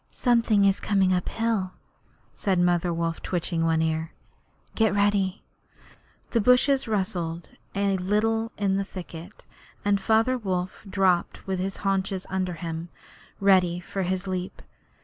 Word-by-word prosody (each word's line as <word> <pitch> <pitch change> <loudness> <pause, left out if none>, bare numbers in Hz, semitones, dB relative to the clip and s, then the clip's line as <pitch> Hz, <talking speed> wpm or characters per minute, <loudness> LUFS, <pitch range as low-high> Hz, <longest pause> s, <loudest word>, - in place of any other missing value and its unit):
'Something 230 -5 +3
is 195 0 +3
coming 195 -2 +2
up 180 -1 -1
hill,' 220 -5 -1 0.6
said 195 -2 0
Mother 175 0 +2
Wolf, 165 0 -2
twitching 170 -2 -1
one 160 -1 +2
ear. 160 0 -2 0.6
'Get 220 -2 +2
ready.' 200 -1 +1 0.9
The 230 - +2
bushes 250 +4 +4
rustled 180 -5 -2 0.2
a 200 -1 +1
little 225 +4 0
in 195 -2 +1
the 200 - 0
thicket, 180 -1 -10 0.4
and 200 -1 +2
Father 225 +5 +2
Wolf 185 -3 -3
dropped 190 -3 +1
with 190 -1 -2
his 190 +1 -3
haunches 195 -1 0
under 185 -1 -1
him, 165 0 -5 0.5
ready 185 -3 +4
for 195 +2 -5
his 185 +1 -1
leap. 185 -1 -4
190 Hz, 135 wpm, -26 LUFS, 180-205 Hz, 0.9 s, bushes